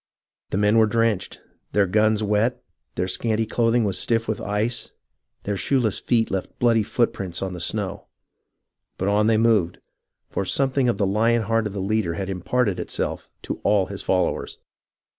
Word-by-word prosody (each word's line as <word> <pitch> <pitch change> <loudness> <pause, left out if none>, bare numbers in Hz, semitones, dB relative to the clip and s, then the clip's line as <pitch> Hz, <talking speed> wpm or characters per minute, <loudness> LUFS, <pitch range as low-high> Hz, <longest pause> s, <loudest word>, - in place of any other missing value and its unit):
The - - -2
men 105 +2 +4
were 110 - +5
drenched, 110 -3 0 0.3
their 100 -1 +4
guns 110 +3 +2
wet, 105 +4 +1 0.3
their 90 - -1
scanty 110 +3 0
clothing 115 +1 +2
was 100 -3 -1
stiff 115 -1 0
with 110 -1 -2
ice, 105 +4 -2 0.5
their 100 - -2
shoeless 120 0 0
feet 115 -2 +1
left 95 -1 -4
bloody 115 -2 +3
footprints 100 -5 -1
on 95 -1 -3
the 90 - -6
snow; 100 +2 -3 0.9
but 95 - -2
on 105 +1 +3
they 110 -1 +4
moved, 110 -6 +2 0.5
for - - -1
something 135 +4 +1
of 115 - 0
the 100 - +1
lion 115 +4 +2
heart 115 0 +1
of 100 - -8
the 100 - -4
leader 95 -3 0
had 95 +2 -3
imparted 95 +3 0
itself - - -3
to - - -4
all 100 -2 +3
his 100 +1 -7
followers. 90 -1 -1
105 Hz, 170 wpm, -23 LUFS, 95-115 Hz, 0.9 s, were